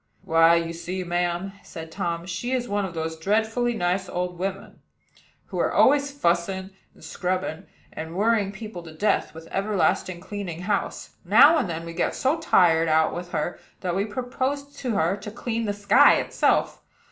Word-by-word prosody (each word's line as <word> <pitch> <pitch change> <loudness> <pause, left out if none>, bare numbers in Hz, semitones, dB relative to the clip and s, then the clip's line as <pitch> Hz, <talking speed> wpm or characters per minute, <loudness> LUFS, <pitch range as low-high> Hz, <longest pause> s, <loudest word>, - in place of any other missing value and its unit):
"Why, 165 +1 +5
you 165 0 -1
see, 180 +2 -4
ma'am," 175 +2 -1
said 160 -2 -9
Tom, 170 +1 -3
"she 190 +8 -3
is 245 -1 -1
one 205 -1 -1
of 175 -3 -7
those 160 0 -4
dreadfully 225 +6 +1
nice 180 -1 -1
old 180 -1 -3
women, 195 +1 -5 0.7
who - - -5
are - - +1
always 285 +1 +4
fussing 190 -5 -1 0.2
and - - -18
scrubbing, 185 -1 -3 0.3
and 160 +1 -6
worrying 210 0 +2
people 210 -2 -8
to 165 -2 -11
death, 200 -3 0
with 160 0 -10
everlastingly 190 -3 0
cleaning 190 -5 -5
house. 200 +2 -3
Now 280 - +7
and 185 - -2
then 165 0 -4
we 170 - -7
get - - -1
so 285 +5 +1
tired 165 - +4
out 155 0 +3
with 175 0 -6
her 175 - -3 0.2
that 175 -2 -2
we 195 +2 0
propose 260 +5 -3
to 245 -5 -2
her 170 +2 +2
to 200 +1 -8
clean 230 +1 -3
the 205 - 0
sky 205 0 +5
itself. - - +1
190 Hz, 175 wpm, -25 LUFS, 170-215 Hz, 0.7 s, Now